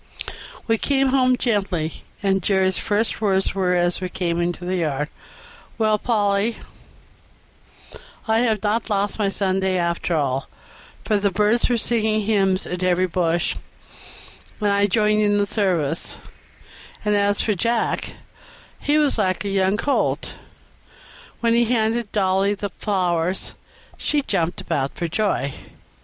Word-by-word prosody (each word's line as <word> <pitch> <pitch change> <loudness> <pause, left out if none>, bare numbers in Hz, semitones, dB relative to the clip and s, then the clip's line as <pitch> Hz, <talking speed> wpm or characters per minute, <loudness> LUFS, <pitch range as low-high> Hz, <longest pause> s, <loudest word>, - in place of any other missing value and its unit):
We 225 -1 +1
came 275 -1 +2
home 255 -1 +3
gently, 195 -9 -1 0.2
and 195 -1 +2
Jerry's 190 0 +1
first 215 +2 -1
words 195 -2 +1
were, 185 -2 +1
as 175 +1 +1
we 185 - -3
came 175 -2 -1
into 175 +1 -2
the 185 +1 -1
yard, 150 -3 -1 0.7
"Well, 215 -2 +2
Polly, 210 -1 +1 1.7
I 220 0 +3
have 220 -4 +1
not 220 +2 0
lost 205 0 -1
my 200 -2 +2
Sunday 190 -1 0
after 170 0 0
all, 135 -3 -1 0.6
for 210 -3 +2
the 200 0 +2
birds 210 +6 +2
were 240 - +2
singing 220 -2 +1
hymns 195 -3 +1
in 180 0 -4
every 185 0 +3
bush, 175 -1 0 1.0
and 210 -2 +1
I 200 0 +3
joined 210 +1 +2
in 205 -1 +3
the 205 - +2
service; 175 -7 -1 0.9
and 210 0 +2
as 205 0 +2
for 215 - +1
Jack, 230 +4 -1 0.6
he 295 +1 +1
was 295 -6 +2
like 185 -1 0
a - - -1
young 195 +1 +2
colt." 280 +6 0 1.1
When 230 -1 +3
he 235 0 +4
handed 225 -1 0
Dolly 195 0 +2
the 205 0 -4
flowers 180 -2 -1 0.5
she 295 -2 0
jumped 170 -8 -1
about 135 0 -2
for 170 - -2
joy. 165 -7 0
200 Hz, 140 wpm, -22 LUFS, 180-220 Hz, 1.7 s, he